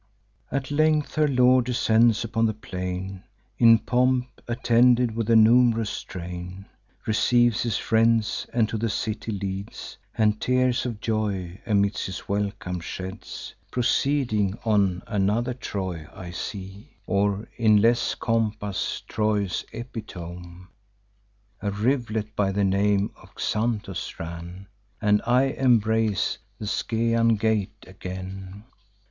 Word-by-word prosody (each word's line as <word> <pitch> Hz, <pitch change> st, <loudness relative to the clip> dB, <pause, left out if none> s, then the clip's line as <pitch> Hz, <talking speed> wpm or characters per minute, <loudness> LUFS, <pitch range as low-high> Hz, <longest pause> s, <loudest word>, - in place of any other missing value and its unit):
"At 140 Hz, -1 st, -2 dB
length 155 Hz, 0 st, +2 dB
her 155 Hz, -1 st, +3 dB
lord 125 Hz, -2 st, +4 dB
descends 115 Hz, -2 st, +3 dB
upon 115 Hz, 0 st, +1 dB
the 110 Hz, -, -2 dB
plain, 90 Hz, -1 st, -5 dB, 0.4 s
In 115 Hz, -1 st, +8 dB
pomp, 125 Hz, +1 st, 0 dB
attended 120 Hz, 0 st, +3 dB
with 115 Hz, -1 st, -2 dB
a 115 Hz, -, +5 dB
num'rous 115 Hz, -1 st, +4 dB
train; 90 Hz, +1 st, -7 dB, 0.4 s
Receives 120 Hz, +1 st, +3 dB
his 115 Hz, -4 st, 0 dB
friends, 115 Hz, -1 st, +2 dB
and 115 Hz, -2 st, +2 dB
to 110 Hz, -, -3 dB
the 115 Hz, +1 st, 0 dB
city 110 Hz, +2 st, -3 dB
leads, 100 Hz, -1 st, -5 dB, 0.2 s
And 105 Hz, -1 st, +2 dB
tears 125 Hz, 0 st, +1 dB
of 110 Hz, -4 st, -6 dB
joy 100 Hz, -5 st, -2 dB
amidst 100 Hz, -1 st, +1 dB
his 95 Hz, -, -7 dB
welcome 100 Hz, -3 st, -2 dB
sheds. 95 Hz, +2 st, -7 dB, 0.2 s
Proceeding 120 Hz, -5 st, +1 dB
on, 100 Hz, -5 st, +2 dB
another 105 Hz, +4 st, 0 dB
Troy 95 Hz, -9 st, -5 dB
I 90 Hz, -2 st, -8 dB
see, 95 Hz, +3 st, -7 dB
Or, 100 Hz, +2 st, 0 dB
in 110 Hz, -3 st, +5 dB
less 115 Hz, +3 st, +2 dB
compass, 110 Hz, -3 st, -1 dB
Troy's 105 Hz, -4 st, 0 dB
epitome. 90 Hz, -7 st, -8 dB, 1.0 s
A 100 Hz, -, -1 dB
riv'let 110 Hz, -1 st, -1 dB
by 100 Hz, -1 st, +1 dB
the 100 Hz, +1 st, 0 dB
name 100 Hz, +1 st, +2 dB
of -, -, -18 dB
Xanthus 105 Hz, -4 st, -2 dB
ran, 85 Hz, +3 st, -7 dB, 0.3 s
And 105 Hz, -1 st, +3 dB
I 125 Hz, +2 st, +4 dB
embrace 110 Hz, -7 st, +2 dB, 0.2 s
the 105 Hz, -, -6 dB
Scaean 115 Hz, +1 st, +1 dB
gate 110 Hz, -3 st, -1 dB
again. 95 Hz, +1 st, -8 dB
110 Hz, 120 wpm, -25 LUFS, 95-115 Hz, 1.0 s, In